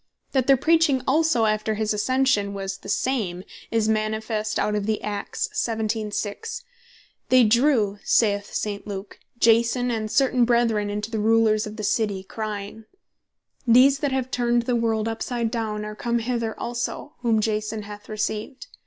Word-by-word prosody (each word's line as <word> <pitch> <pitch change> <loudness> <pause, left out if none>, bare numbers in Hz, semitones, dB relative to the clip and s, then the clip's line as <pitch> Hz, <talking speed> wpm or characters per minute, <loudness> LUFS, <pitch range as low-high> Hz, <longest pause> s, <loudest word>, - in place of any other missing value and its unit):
That 260 -2 +1
their 275 -1 +6
Preaching 315 -2 +3
also 300 -5 +3
after 215 0 0
his 215 0 0
ascension 210 -2 +1
was 195 0 -4
the - - -10
same, 200 -9 -1 0.3
is 225 -1 +1
manifest 215 0 -1
out 210 - 0
of 210 0 -1
Acts 205 -1 -3
17.6. 220 - -2 0.7
"They 255 -1 +6
drew 225 -3 +3
(saith 205 -2 +2
St. 205 -1 -3
Luke) 200 0 -7 0.2
Jason 235 +2 +3
and 220 -2 -2
certain 255 0 +3
Brethren 230 -3 +2
unto 210 +2 -4
the 220 - -2
Rulers 220 0 +3
of 210 - -8
the 215 - -6
City, 205 -2 0
crying, 215 +1 -6 0.8
These 260 +4 +6
that 285 -1 -1
have 260 -1 -2
turned 240 -1 +1
the 245 +1 0
world 225 -2 0
upside 230 0 -2
down 215 -3 -3
are 210 - -6
come 235 +2 -1
hither 230 -1 -2
also, 240 +4 -4
whom 230 -3 +2
Jason 215 0 -2
hath 205 0 -10
received. 215 +4 -3
220 Hz, 155 wpm, -24 LUFS, 210-240 Hz, 0.8 s, their